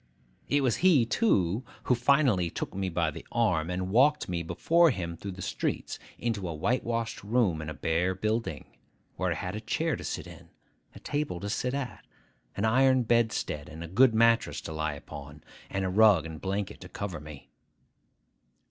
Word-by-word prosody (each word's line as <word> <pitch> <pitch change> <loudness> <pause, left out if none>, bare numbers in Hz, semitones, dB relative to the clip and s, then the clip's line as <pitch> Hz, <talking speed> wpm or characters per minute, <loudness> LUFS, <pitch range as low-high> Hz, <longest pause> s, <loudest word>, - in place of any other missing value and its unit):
It 145 0 +3
was 125 -4 +2
he, 165 -9 +5
too, 110 - +1 0.2
who - - +2
finally 125 - +3
took - - -5
me 95 0 -2
by 85 -2 0
the - - -9
arm, 90 -9 +1
and 90 +1 -3
walked 145 +7 +4
me 85 -2 -2
before 170 - +3
him 85 - -3
through 100 +3 -7
the 90 -1 -7
streets, - - -3 0.2
into 105 -6 -2
a 80 - -4
whitewashed 115 +5 -1
room 100 -7 +1
in 75 - -5
a 75 - -6
bare 85 +5 0
building, 110 +4 -2 0.5
where - - -1
I - - 0
had 90 +2 -4
a 110 - -5
chair 160 +8 -1
to - - -8
sit - - -4
in, - - -13 0.5
a - - -10
table 145 -12 -2
to 100 0 -3
sit 125 +5 -1
at, 140 -3 -5 0.5
an 100 - +1
iron 130 +2 +4
bedstead 115 -10 0
and 80 +2 -8
good 120 +1 +5
mattress 115 0 +3
to 80 - -6
lie 80 -1 -2
upon, 70 +1 -10 0.3
and 95 0 -2
a - - 0
rug 100 -4 +5
and 80 -1 -8
blanket 100 0 -3
to 90 - -10
cover 95 -3 -5
me. 75 -2 -12
100 Hz, 185 wpm, -29 LUFS, 85-120 Hz, 0.5 s, he